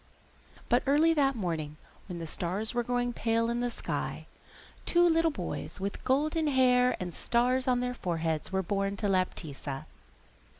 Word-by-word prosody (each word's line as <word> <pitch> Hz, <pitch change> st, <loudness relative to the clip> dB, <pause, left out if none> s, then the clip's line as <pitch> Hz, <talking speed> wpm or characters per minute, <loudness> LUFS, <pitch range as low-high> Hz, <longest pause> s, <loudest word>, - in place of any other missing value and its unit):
But -, -, +3 dB
early 310 Hz, +4 st, +5 dB
that 275 Hz, -3 st, +2 dB
morning, 160 Hz, -7 st, -3 dB, 0.3 s
when 180 Hz, -3 st, -6 dB
the 165 Hz, -, -5 dB
stars 185 Hz, +8 st, -3 dB
were 240 Hz, -, +1 dB
growing 245 Hz, 0 st, -1 dB
pale 230 Hz, 0 st, +1 dB
in 235 Hz, -, -1 dB
the 245 Hz, 0 st, 0 dB
sky, -, -, -4 dB, 0.6 s
two 350 Hz, 0 st, +4 dB
little 330 Hz, 0 st, +3 dB
boys 290 Hz, -, -5 dB
with 200 Hz, +1 st, -4 dB
golden 305 Hz, +4 st, +1 dB
hair 250 Hz, -2 st, +4 dB
and 180 Hz, -2 st, -4 dB
stars 250 Hz, -, +1 dB
on 250 Hz, -1 st, +3 dB
their 250 Hz, 0 st, -1 dB
foreheads 165 Hz, -7 st, -2 dB
were 190 Hz, 0 st, 0 dB
born 195 Hz, +2 st, -1 dB
to 205 Hz, -, 0 dB
Laptitza. 155 Hz, -7 st, -2 dB
235 Hz, 160 wpm, -30 LUFS, 185-260 Hz, 0.6 s, early